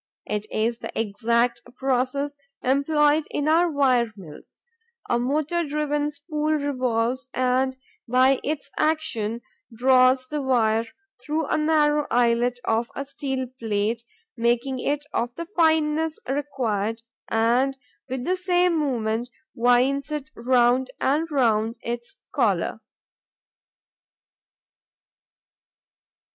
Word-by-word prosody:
It 210 Hz, 0 st, -3 dB
is 230 Hz, +2 st, -1 dB
the -, -, -6 dB
exact 235 Hz, +3 st, +1 dB, 0.2 s
process 270 Hz, +2 st, 0 dB, 0.3 s
employed 295 Hz, +3 st, +3 dB
in 290 Hz, -, -2 dB
our 335 Hz, +3 st, +4 dB
wire 255 Hz, -6 st, +2 dB
mills: 160 Hz, -6 st, -13 dB, 0.5 s
a 240 Hz, -, +1 dB
motor 305 Hz, +7 st, 0 dB
driven 295 Hz, -1 st, -1 dB
spool 300 Hz, +1 st, -2 dB
revolves 255 Hz, -3 st, -1 dB
and, 255 Hz, +1 st, +1 dB, 0.3 s
by 255 Hz, +2 st, +4 dB
its 295 Hz, 0 st, -3 dB
action, 235 Hz, -8 st, 0 dB, 0.3 s
draws 255 Hz, +2 st, +4 dB
the 295 Hz, +2 st, -3 dB
wire 230 Hz, -4 st, +2 dB, 0.4 s
through 310 Hz, +1 st, -1 dB
the -, -, +3 dB
narrow 300 Hz, -1 st, +2 dB
eyelet 240 Hz, +1 st, +2 dB
of 225 Hz, +1 st, 0 dB
a 275 Hz, -, -4 dB
steel 270 Hz, -1 st, -3 dB
plate, 220 Hz, +1 st, -1 dB, 0.3 s
making 240 Hz, +2 st, 0 dB
it 290 Hz, +2 st, -1 dB
of 240 Hz, +1 st, -1 dB
the 335 Hz, -, -5 dB
fineness 320 Hz, -3 st, +2 dB
required, 235 Hz, -6 st, -2 dB, 0.2 s
and, 245 Hz, +4 st, +2 dB, 0.3 s
with 255 Hz, 0 st, -3 dB
the 370 Hz, +1 st, +1 dB
same 360 Hz, -2 st, +2 dB
movement, 240 Hz, -4 st, -1 dB, 0.2 s
winds 250 Hz, +5 st, +2 dB
it 300 Hz, 0 st, -4 dB
round 250 Hz, +1 st, +3 dB
and 305 Hz, +5 st, +1 dB
round 230 Hz, -5 st, +2 dB
its 235 Hz, 0 st, -5 dB, 0.2 s
collar. -, -, +1 dB
260 Hz, 110 wpm, -24 LUFS, 235-295 Hz, 0.5 s, our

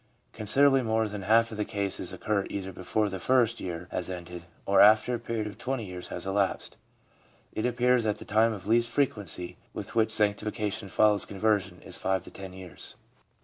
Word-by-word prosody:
Considerably 135 Hz, +5 st, +3 dB
more 110 Hz, -1 st, +1 dB
than 105 Hz, -1 st, -6 dB
half 115 Hz, +4 st, +3 dB
of 110 Hz, -, -6 dB
the 105 Hz, -, 0 dB
cases 100 Hz, -3 st, -1 dB
occur 100 Hz, -2 st, -1 dB
either 95 Hz, -1 st, -4 dB
before 105 Hz, +4 st, -1 dB
the 95 Hz, -1 st, -5 dB
first 120 Hz, +1 st, +2 dB
year 90 Hz, -1 st, -5 dB
has 90 Hz, -, -2 dB
ended, 90 Hz, -1 st, -7 dB, 0.2 s
or 100 Hz, -, +4 dB
after 110 Hz, +4 st, +6 dB
a 120 Hz, -, -1 dB
period 115 Hz, -2 st, -3 dB
of 105 Hz, 0 st, -8 dB
twenty 130 Hz, -3 st, -2 dB
years 90 Hz, -1 st, -7 dB
has -, -, -5 dB
elapsed. 95 Hz, 0 st, -1 dB, 0.8 s
It 110 Hz, +3 st, -1 dB
appears 125 Hz, 0 st, +2 dB
that 105 Hz, -1 st, 0 dB
the -, -, -9 dB
time 110 Hz, +2 st, +3 dB
of 100 Hz, -4 st, -7 dB
least 115 Hz, +2 st, +2 dB
frequency 105 Hz, -, 0 dB, 0.2 s
with -, -, -6 dB
which 110 Hz, -1 st, +2 dB
sanctification 105 Hz, 0 st, +1 dB
follows 105 Hz, +1 st, +4 dB
conversion 100 Hz, -3 st, -1 dB
is -, -, -5 dB
five 95 Hz, -1 st, -1 dB
to -, -, -8 dB
ten 95 Hz, -1 st, -9 dB
years. 95 Hz, -1 st, -7 dB
105 Hz, 190 wpm, -28 LUFS, 95-115 Hz, 0.8 s, after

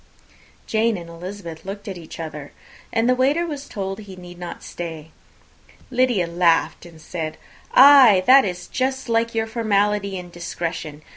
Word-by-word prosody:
Jane 225 Hz, -1 st, +1 dB
and 170 Hz, -1 st, -9 dB
Elizabeth 170 Hz, -1 st, -8 dB
looked 200 Hz, +2 st, -7 dB
at 195 Hz, -, -5 dB
each 170 Hz, -2 st, -11 dB
other, 150 Hz, -3 st, -7 dB, 0.4 s
and 225 Hz, +1 st, +1 dB
the 255 Hz, -, +5 dB
waiter 280 Hz, +7 st, +2 dB
was 290 Hz, -4 st, -6 dB
told 195 Hz, 0 st, -4 dB
that -, -, -9 dB
he 190 Hz, -2 st, -10 dB
need 180 Hz, -1 st, -12 dB
not 175 Hz, -1 st, -8 dB
stay. 160 Hz, -2 st, -7 dB, 0.8 s
Lydia 245 Hz, -7 st, +2 dB
laughed, 170 Hz, 0 st, +1 dB
and 165 Hz, -2 st, -15 dB
said, 160 Hz, -1 st, -5 dB, 0.4 s
"Ay, 260 Hz, -8 st, +8 dB
that 265 Hz, +1 st, +7 dB
is 180 Hz, -2 st, -4 dB
just 265 Hz, -1 st, -2 dB
like 230 Hz, 0 st, +1 dB
your 225 Hz, 0 st, +1 dB
formality 210 Hz, -3 st, 0 dB
and 175 Hz, -1 st, -9 dB
discretion. 165 Hz, -3 st, -5 dB
195 Hz, 160 wpm, -22 LUFS, 170-230 Hz, 0.8 s, Ay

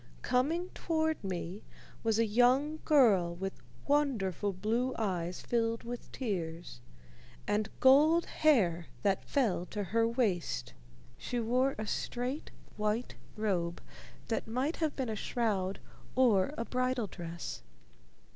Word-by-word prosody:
Coming 325 Hz, +8 st, +1 dB
toward 315 Hz, -3 st, -1 dB
me 185 Hz, +1 st, -4 dB, 0.4 s
was 225 Hz, -1 st, +1 dB
a 230 Hz, -, +4 dB
young 255 Hz, +8 st, +3 dB
girl 205 Hz, -, +4 dB
with 195 Hz, +2 st, -5 dB, 0.2 s
wonderful 225 Hz, -, +1 dB
blue 225 Hz, +7 st, -1 dB
eyes 180 Hz, -5 st, -2 dB
filled 230 Hz, -1 st, 0 dB
with 240 Hz, +1 st, -7 dB
tears 170 Hz, -, -4 dB, 0.7 s
and 210 Hz, 0 st, +1 dB
gold 300 Hz, +6 st, +6 dB
hair 190 Hz, -, +2 dB, 0.2 s
that 195 Hz, -2 st, +2 dB
fell 215 Hz, -10 st, +1 dB
to 210 Hz, -, -3 dB
her 225 Hz, +4 st, +2 dB
waist. 190 Hz, -, -1 dB, 0.5 s
She 245 Hz, -, -2 dB
wore 250 Hz, +4 st, +1 dB
a 215 Hz, -, -3 dB
straight, 250 Hz, +6 st, -3 dB, 0.3 s
white 215 Hz, +3 st, -1 dB, 0.2 s
robe 180 Hz, -6 st, -1 dB, 0.5 s
that 225 Hz, -, -2 dB
might 255 Hz, +8 st, -1 dB
have 315 Hz, -3 st, -1 dB
been 265 Hz, -2 st, -2 dB
a 220 Hz, -, -2 dB
shroud 200 Hz, -4 st, -1 dB, 0.4 s
or 240 Hz, -4 st, +4 dB
a 230 Hz, -, -2 dB
bridal 255 Hz, -1 st, 0 dB
dress. 170 Hz, -, -6 dB
225 Hz, 125 wpm, -32 LUFS, 190-260 Hz, 0.7 s, gold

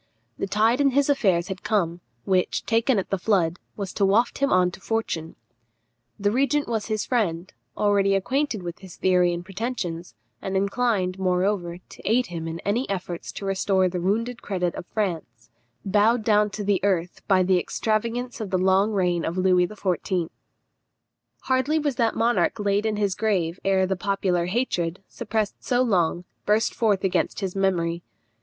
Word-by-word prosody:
The -, -, -1 dB
tide 220 Hz, +6 st, +2 dB
in 280 Hz, -, +5 dB
his 285 Hz, 0 st, +4 dB
affairs 190 Hz, -10 st, +2 dB
had 190 Hz, 0 st, -5 dB
come, 175 Hz, -5 st, 0 dB, 0.2 s
which, 185 Hz, -1 st, +1 dB
taken 230 Hz, +2 st, +2 dB
at 195 Hz, -, -2 dB
the 195 Hz, -, 0 dB
flood, 175 Hz, -4 st, +1 dB, 0.2 s
was 200 Hz, -3 st, -5 dB
to 205 Hz, -, 0 dB
waft 205 Hz, +5 st, +2 dB
him 280 Hz, 0 st, +1 dB
on 180 Hz, -1 st, +4 dB
to 185 Hz, -, -12 dB
fortune. 175 Hz, -8 st, -3 dB, 0.8 s
The 205 Hz, 0 st, +1 dB
regent 275 Hz, +4 st, +1 dB
was 220 Hz, -3 st, -2 dB
his 215 Hz, -1 st, -1 dB
friend, 185 Hz, -7 st, -1 dB, 0.2 s
already 200 Hz, -1 st, +3 dB
acquainted 245 Hz, +1 st, -1 dB
with 175 Hz, -1 st, -6 dB
his 190 Hz, -3 st, -12 dB
theory 180 Hz, -1 st, +3 dB
and 175 Hz, 0 st, -4 dB
pretensions, 190 Hz, -5 st, -4 dB, 0.3 s
and 190 Hz, 0 st, -2 dB
inclined, 195 Hz, -2 st, 0 dB
moreover, 180 Hz, -1 st, 0 dB
to 180 Hz, -, -15 dB
aid 245 Hz, +4 st, +2 dB
him 165 Hz, -4 st, -6 dB
in 165 Hz, 0 st, -5 dB
any 215 Hz, +4 st, -1 dB
efforts 180 Hz, -3 st, -4 dB
to 200 Hz, -, -6 dB
restore 195 Hz, -1 st, +2 dB
the 180 Hz, 0 st, -3 dB
wounded 230 Hz, +6 st, -1 dB
credit 180 Hz, -3 st, -1 dB
of -, -, -8 dB
France, 155 Hz, -, -4 dB, 0.3 s
bowed 215 Hz, +4 st, +3 dB
down 210 Hz, -1 st, +3 dB
to 210 Hz, +1 st, -5 dB
the 200 Hz, -2 st, +2 dB
earth 180 Hz, -3 st, 0 dB
by 190 Hz, -2 st, +4 dB
the 185 Hz, 0 st, +3 dB
extravagance 230 Hz, +6 st, -2 dB
of 210 Hz, -, -4 dB
the 185 Hz, -, +1 dB
long 190 Hz, +3 st, +3 dB
reign 180 Hz, -3 st, +1 dB
of 170 Hz, -, -3 dB
Louis 185 Hz, -1 st, +3 dB
XIV. 185 Hz, -3 st, -2 dB, 1.1 s
Hardly 260 Hz, +4 st, +1 dB
was 290 Hz, -4 st, -1 dB
that 230 Hz, -2 st, +1 dB
monarch 235 Hz, +1 st, +2 dB
laid 205 Hz, +1 st, +1 dB
in 215 Hz, -, 0 dB
his 205 Hz, -2 st, 0 dB
grave 185 Hz, -5 st, 0 dB
ere 190 Hz, -1 st, +3 dB
the 190 Hz, +1 st, -1 dB
popular 185 Hz, -2 st, 0 dB
hatred, 185 Hz, -5 st, -1 dB
suppressed 215 Hz, -2 st, -3 dB
so 250 Hz, 0 st, +2 dB
long, 180 Hz, -6 st, +1 dB, 0.2 s
burst 210 Hz, +2 st, +2 dB
forth 210 Hz, -5 st, +1 dB
against 190 Hz, +2 st, 0 dB
his 190 Hz, -1 st, -3 dB
memory. 175 Hz, -3 st, 0 dB
195 Hz, 175 wpm, -24 LUFS, 180-220 Hz, 1.1 s, in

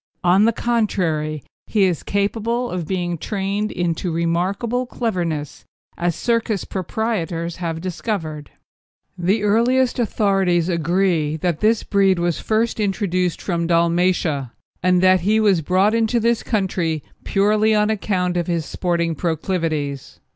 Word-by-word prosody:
On 185 Hz, +4 st, +5 dB
the 230 Hz, -, +4 dB
contrary, 175 Hz, -, -1 dB, 0.2 s
he 210 Hz, -3 st, +2 dB
is 180 Hz, -4 st, +1 dB
capable 225 Hz, +4 st, -1 dB
of 175 Hz, -4 st, -3 dB
being 175 Hz, -2 st, -2 dB
trained 205 Hz, +2 st, -2 dB
into 175 Hz, 0 st, -2 dB
remarkable 190 Hz, +9 st, -1 dB
cleverness, 170 Hz, -, -3 dB, 0.3 s
as 175 Hz, -1 st, -1 dB
circus 230 Hz, -4 st, 0 dB
proprietors 185 Hz, -4 st, -3 dB
have 165 Hz, -2 st, -3 dB
discovered. 165 Hz, -5 st, -4 dB, 0.7 s
The 190 Hz, +4 st, 0 dB
earliest 245 Hz, +5 st, +2 dB
authorities 195 Hz, -6 st, +1 dB
agree 170 Hz, -2 st, +1 dB
that 165 Hz, -1 st, -1 dB
this 220 Hz, +1 st, +2 dB
breed 195 Hz, -2 st, +2 dB
was 175 Hz, -1 st, 0 dB
first 225 Hz, +1 st, 0 dB
introduced 185 Hz, -3 st, -1 dB
from 170 Hz, -3 st, -1 dB
Dalmatia, 170 Hz, -5 st, +1 dB, 0.3 s
and 180 Hz, 0 st, +3 dB
that 185 Hz, -1 st, +5 dB
he 210 Hz, +5 st, +2 dB
was 200 Hz, -6 st, +3 dB
brought 185 Hz, +6 st, +2 dB
into 230 Hz, +1 st, +2 dB
this 235 Hz, 0 st, +1 dB
country 180 Hz, -, -1 dB, 0.2 s
purely 215 Hz, +2 st, +2 dB
on 210 Hz, +1 st, +2 dB
account 185 Hz, -4 st, -1 dB
of 175 Hz, -, -1 dB
his 170 Hz, -3 st, -1 dB
sporting 170 Hz, -2 st, -1 dB
proclivities. 160 Hz, -4 st, -2 dB
185 Hz, 130 wpm, -21 LUFS, 170-215 Hz, 0.7 s, On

